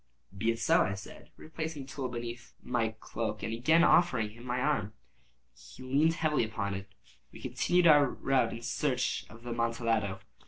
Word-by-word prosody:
"Be 110 +4 0
it 115 - +1
so," 115 - +3
I 100 - 0
said, 95 - -11
replacing 155 -2 -5
the - - -14
tool 130 -1 -4
beneath 120 0 -6
the 115 -3 -1
cloak, 110 -2 -4
and 110 - -2
again 160 +9 +4
offering 125 -12 +4
him 120 +2 -14
my 125 0 -1
arm. 125 -7 0 0.6
He - - -13
leaned 145 +6 +2
upon 150 -2 +2
it 115 - 0
heavily. 100 -2 -3 0.4
We - - -12
continued 180 0 +1
our 145 -3 +7
route 130 -2 +1
in 115 - -7
search 125 +2 -1
of 115 +1 -14
the 120 - -5
Amontillado. 115 -4 0
120 Hz, 180 wpm, -31 LUFS, 115-145 Hz, 0.6 s, our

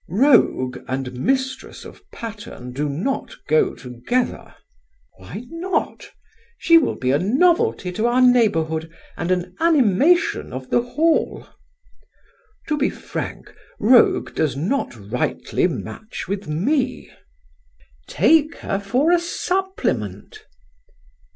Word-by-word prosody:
"Rogue 190 - +3
and 130 -1 -3
mistress 260 - -2
of - - -12
Patterne 205 - -8
do 145 +3 -2
not 185 - -3
go 450 -5 +2
together." 125 - -3 0.6
"Why 95 - -9
not? 350 +3 -3 0.5
She 335 0 +6
will 310 - -1
be 130 0 -1
a 140 - +2
novelty 300 - +2
to 215 +6 0
our 240 +1 +2
neighbourhood 165 -11 +2 0.2
and 170 - -4
an 180 0 -1
animation 315 - +3
of 130 0 -7
the 240 - +3
Hall." 310 +7 0 1.2
"To 300 - 0
be 280 - +2
frank, - - -7 0.3
rogue 235 +3 +4
does 150 -3 -1
not 195 - -1
rightly 110 +3 -1
match 215 - -7
with 200 -1 -4
me." 250 - -1 1.0
"Take 305 - +3
her 195 - -3
for 250 +11 +1
a 350 - +5
supplement." 340 - -3
225 Hz, 110 wpm, -21 LUFS, -, 1.2 s, She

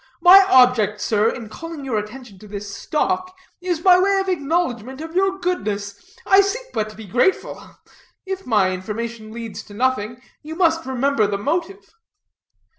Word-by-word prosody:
My 360 +3 +9
object, 245 - +4
sir, 210 +1 +1
in 230 -2 -6
calling 325 +4 -8
your 235 -5 -1
attention 210 -1 -10
to 210 - -13
this 200 -1 -7
stock, 370 - -2 0.2
is 355 -3 -2
by 365 0 +6
way 390 +1 +2
of 385 0 -2
acknowledgment 280 - -2
of 320 +2 -8
your 385 +1 +1
goodness. 215 - -4
I 390 - +5 0.3
but 215 - -1
seek - - -9
to 215 - -13
be 220 - -9
grateful; 250 - -1 0.5
if 385 -3 -5
my 205 -5 +2
information 215 +4 -6
leads 230 -1 -7
to 205 - -14
nothing, 240 -1 -1 0.2
you 315 +1 -8
must 330 -3 +1
remember 265 -3 +1
the 200 -1 -2
motive." 340 - -3
255 Hz, 165 wpm, -21 LUFS, 215-355 Hz, 0.5 s, My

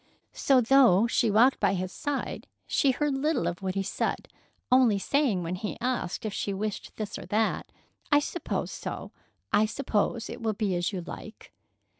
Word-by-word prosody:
So, 265 -2 +3
though 235 -5 +5
she 235 -1 +2
walked 235 +6 +4
by 200 -1 +2
his 185 0 -3
side, 285 +6 -4 0.2
she 280 - +2
heard 290 +2 +1
little 300 +4 0
of 175 +2 -3
what 190 -1 -3
he 195 - 0
said, 195 - -2 0.4
only 250 -5 +5
saying 235 -4 +1
when 170 +1 -3
he 195 +3 -4
asked 245 -6 -2
if 215 - -3
she 200 -2 -2
wished 210 +1 -4
this 215 -2 -5
or - - -9
that: 220 +1 0 0.4
"I 290 - +7
suppose 320 +4 -3
so. - - -6 0.4
I 215 - +4
suppose 225 -1 -1
it - - -8
will 220 -1 0
be 205 -2 -1
as 175 +2 0
you 190 -3 -4
like." 215 +5 -10
220 Hz, 180 wpm, -28 LUFS, 195-260 Hz, 0.4 s, I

